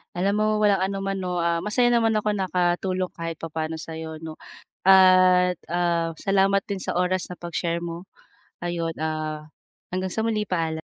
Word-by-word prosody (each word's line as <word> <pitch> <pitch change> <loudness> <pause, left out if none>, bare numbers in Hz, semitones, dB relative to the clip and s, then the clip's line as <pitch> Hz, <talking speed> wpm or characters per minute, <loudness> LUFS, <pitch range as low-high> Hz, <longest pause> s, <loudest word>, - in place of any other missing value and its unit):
Alam 190 +3 +1
mo, 215 - +2 0.2
walang 205 -2 +4
anuman 195 0 -3
'no. 180 -2 -2
Ah, 170 0 +1
masaya 210 +7 +2
naman 230 -2 +3
ako 215 0 0
nakatulong 185 0 0
kahit 165 -1 -3
papaano 160 0 -4
sa'yo 160 -1 -7
'no, 160 -1 -8 0.4
at, 185 -1 +6
ah, 170 -1 0
salamat 195 +2 +2
din 200 -2 -4
sa - - -3
oras 180 +1 0
na 180 - -8
pag-share 170 0 -3
mo. 170 +2 -7 0.6
Ayun, 170 -1 -2
ah, 155 -1 -3 0.5
hanggang 185 +1 -1
sa 220 - -1
muli 215 -3 -1
paalam. 160 -3 -1
180 Hz, 160 wpm, -24 LUFS, 165-195 Hz, 0.6 s, at